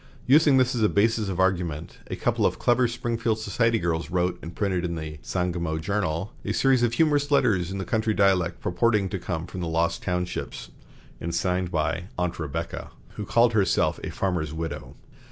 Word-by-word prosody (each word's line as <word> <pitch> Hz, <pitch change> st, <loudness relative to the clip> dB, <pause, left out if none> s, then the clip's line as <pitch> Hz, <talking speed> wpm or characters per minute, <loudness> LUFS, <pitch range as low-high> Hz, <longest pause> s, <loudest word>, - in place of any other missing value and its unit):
Using 145 Hz, +1 st, +5 dB
this 130 Hz, 0 st, +3 dB
as 120 Hz, -, -1 dB
a 105 Hz, -, +4 dB
basis 110 Hz, 0 st, +2 dB
of 95 Hz, -1 st, -3 dB
argument, 85 Hz, -4 st, -1 dB
a -, -, -3 dB
couple -, -, 0 dB
of -, -, +2 dB
clever 125 Hz, 0 st, +3 dB
Springfield 115 Hz, -1 st, -1 dB
society 115 Hz, +2 st, +1 dB
girls 85 Hz, -4 st, -1 dB
wrote 90 Hz, 0 st, 0 dB
and 85 Hz, +1 st, -8 dB
printed 95 Hz, -4 st, 0 dB
in 85 Hz, -1 st, -2 dB
the 80 Hz, -1 st, -6 dB
"Sangamo 85 Hz, -3 st, -2 dB
Journal" 95 Hz, +2 st, -2 dB
a -, -, -2 dB
series 135 Hz, -2 st, +3 dB
of 120 Hz, -1 st, +2 dB
humorous 145 Hz, 0 st, +2 dB
letters 110 Hz, -, +2 dB
in 95 Hz, 0 st, -4 dB
country 110 Hz, +2 st, 0 dB
dialect, 90 Hz, -3 st, +2 dB
purporting 105 Hz, +1 st, +1 dB
to 95 Hz, -, -3 dB
come 85 Hz, -2 st, -3 dB
from 90 Hz, +1 st, -7 dB
the 85 Hz, -, -2 dB
"Lost 85 Hz, +1 st, 0 dB
Townships," 90 Hz, 0 st, -3 dB, 0.5 s
and 85 Hz, 0 st, -3 dB
signed 90 Hz, +1 st, 0 dB
by 80 Hz, +1 st, -1 dB
"Aunt 90 Hz, -1 st, -2 dB
Rebecca," 80 Hz, +2 st, -4 dB, 0.2 s
who 105 Hz, -, -7 dB
called 120 Hz, +2 st, +3 dB
herself 100 Hz, -3 st, +2 dB
a -, -, -3 dB
farmer's 85 Hz, -6 st, -1 dB
widow. 80 Hz, -3 st, -5 dB
95 Hz, 185 wpm, -25 LUFS, 85-115 Hz, 0.5 s, Using